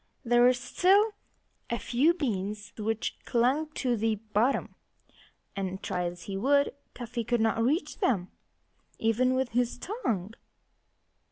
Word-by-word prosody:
There 240 +1 +4
were 250 +1 +7
still 370 - +3 0.6
a 235 - 0
few 285 +10 +2
beans 210 - -3
which 220 0 -2
clung 260 +6 +1
to 250 -5 0
the 220 0 +1
bottom; 215 +5 0 0.8
and 190 -1 -4
try 180 0 -1
as 175 0 -5
he 195 - -5
would, 280 +6 +3 0.2
Cuffy 240 -1 -4
could 235 +1 0
not 225 0 +2
reach 300 - 0
them, 200 - +1 0.7
even 250 +3 +2
with 260 -1 0
his 245 +1 0
tongue. 230 - -3
235 Hz, 135 wpm, -29 LUFS, 210-265 Hz, 0.8 s, were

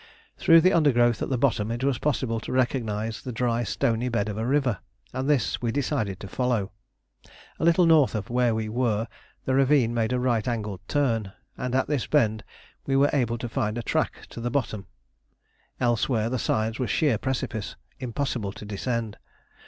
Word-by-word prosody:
Through 165 -2 +6
the 185 +3 +4
undergrowth 120 -8 +3
at - - -2
the 130 - 0
bottom 115 -5 +1
it 120 +2 -3
was 135 -3 +1
possible 130 -6 0
to - - -7
recognise 115 -4 -1
the 130 - -5
dry 120 0 0
stony 115 +3 0
bed 110 -3 -1
of 105 - -4
a 115 - -1
river, 130 -6 +1 0.3
and 130 +2 -2
this 140 -7 +1
we 120 -2 0
decided 115 -8 -1
to 100 - -6
follow. 120 -3 -1 0.9
A - - -3
little 170 +2 +5
north 155 -7 +5
of 110 +1 -3
where 120 -2 +2
we 110 -1 -2
were 115 -1 0 0.4
the 130 - 0
ravine 135 -3 +3
made 115 -1 0
a 125 - +1
right 120 -3 0
angled 105 -6 -3
turn, 115 -9 0 0.2
and 125 0 -3
at 130 - +2
this 145 -5 -1
bend 110 -8 +2 0.4
we 135 - +1
were 140 +1 +4
able 120 -5 +1
to 120 - -4
find 115 -2 -2
a 120 - -3
track - - -1
to - - -7
the 120 - -1
bottom. 110 -7 -2 0.9
Elsewhere 120 -1 +1
the 130 - -1
sides 110 +2 -1
were 125 - 0
sheer 130 -3 +1
precipice, 120 -5 -3 0.2
impossible 125 -4 -2
to 105 - -10
descend. 110 +1 -3
120 Hz, 185 wpm, -26 LUFS, 110-130 Hz, 0.9 s, Through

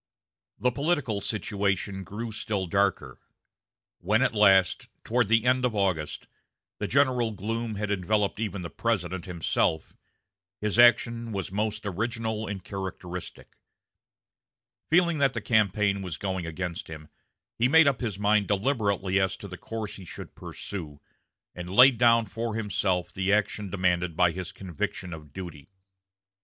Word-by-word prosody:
The 125 - +1
political 140 -7 0
situation 100 -2 -1
grew 110 +5 -6
still 105 -3 -2
darker. 100 +2 0 0.8
When 110 +7 +2
at 125 - +1
last, 95 -4 +4 0.2
toward 120 -1 +1
the 115 +2 +3
end 125 0 +3
of 125 -3 +1
August, 90 -7 -1 0.5
the - - -2
general 130 -4 +2
gloom 110 +3 -3
had 105 0 -2
enveloped 100 +2 0
even 100 -4 -3
the 85 - -6
President 95 -5 -2
himself, 85 -3 -1 0.6
his 105 +2 -1
action 120 -1 +5
was 95 -3 -4
most 105 +1 -2
original 110 +2 -2
and 100 -2 -5
characteristic. 90 -3 -7 1.3
Feeling 170 -1 +3
that 135 -2 +3
the - - -2
campaign 105 -2 +2
was 90 -5 -5
going 95 -3 -3
against 90 +4 -4
him, 80 -1 -9 0.5
he 120 - +4
made 160 +4 +6
up 135 -2 +2
his 110 -6 -2
mind 105 0 +2
deliberately 100 -3 +1
as 95 -1 0
to 100 - -9
the 90 - -8
course 110 +2 -6
he 95 - -11
should - - -9
pursue, 80 -8 -7 0.5
and 90 0 -7
laid 125 +4 +7
down 115 -2 +5
for 115 0 -4
himself 95 -4 -1
the 95 +1 0
action 105 -1 0
demanded 90 -3 0
by 90 -1 +4
his 90 +1 -6
conviction 90 0 -5
of 75 -3 -10
duty. 85 -3 -9
100 Hz, 145 wpm, -27 LUFS, 95-115 Hz, 1.3 s, laid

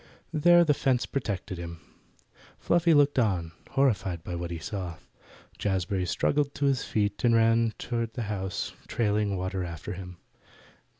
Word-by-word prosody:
There 175 +2 +6
the 150 - +4
fence 130 -3 +1
protected 100 -7 -3
him. 85 -1 -7 0.8
Fluffy 170 -1 +3
looked 145 -2 +4
on, 90 -8 +1 0.2
horrified 95 -11 +1
by 90 - -5
what 85 0 -3
he 85 - -4
saw. 90 -1 -5 0.6
Jazbury 95 -1 0
struggled 140 - +1
to 140 - 0
his 135 -2 +2
feet, 105 -1 -1
and 120 -1 +5
ran 115 0 +3
toward 115 -2 -3
the 120 - -2
house, 95 -3 -3
trailing 105 -3 0
water 95 0 -2
after 85 -3 -6
him. 90 -1 -8
105 Hz, 145 wpm, -28 LUFS, 90-125 Hz, 0.8 s, There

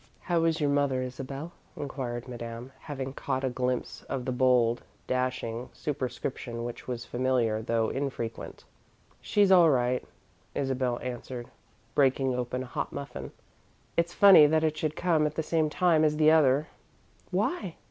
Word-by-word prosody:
"How 170 -2 +1
is 165 0 +1
your 145 -2 +2
mother, 140 -3 +1
Isabel?" 135 +5 -6 0.3
inquired 130 -4 -4
Madame, 120 0 -7
having 135 -3 -5
caught 130 -1 -2
a 130 - 0
glimpse 125 0 -2
of 130 -2 -3
the 130 - -1
bold, 125 -2 +3 0.2
dashing 125 -2 -2
superscription 125 -4 -4
which 120 0 -7
was 120 -2 -4
familiar, 120 -4 0
though 115 0 0
infrequent. 135 -4 -4 0.6
"She's 205 -2 +3
all 175 -3 +7
right," 125 -2 +1 0.5
Isabel 130 -3 0
answered, 125 0 -6 0.4
breaking 135 -1 +3
open 125 +1 -2
a - - -7
hot 125 - -4
muffin. 140 0 -6 0.6
"It's 170 0 +1
funny 185 -6 +8
that 155 +1 +2
it 155 -1 +1
should 155 -1 -2
come 165 -4 +2
at 150 - -6
the 160 - -1
same 155 -1 +1
time 165 -1 +3
as 150 -1 +2
the 155 0 +6
other." 150 -1 +4 0.6
"Why?" 200 - -1
130 Hz, 150 wpm, -28 LUFS, 125-155 Hz, 0.6 s, funny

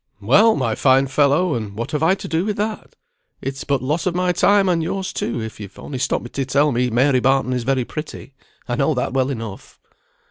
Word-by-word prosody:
"Well, 200 - +4
my 120 -5 0
fine 135 +3 +3
fellow, 145 +5 +2
and 110 -5 -4
what 115 +2 -4
have 150 - -2
I 165 +4 +3
to 195 - -8
do 165 0 0
with 210 0 -2
that? 215 +1 -4 0.4
It's 135 0 -5
but 140 -3 -1
loss 150 +7 -1
of 175 - -1
my 180 0 +1
time, 200 +2 +3
and 175 -2 +2
yours, 190 +3 -3
too, 120 - -3
if 110 -1 -7
you've 100 -2 -10
only 135 -3 -6
stopped - - -1
me 120 - -8
to 140 - -2
tell 145 +3 +2
me 125 0 0
Mary 130 +3 +3
Barton 135 0 +1
is 125 -2 -2
very 130 -2 +1
pretty; 155 -2 -8 0.3
I 120 - -1
know 135 +4 +1
that 125 0 -2
well 130 0 +1
enough." 115 -7 -7
135 Hz, 225 wpm, -20 LUFS, 125-170 Hz, 0.4 s, Well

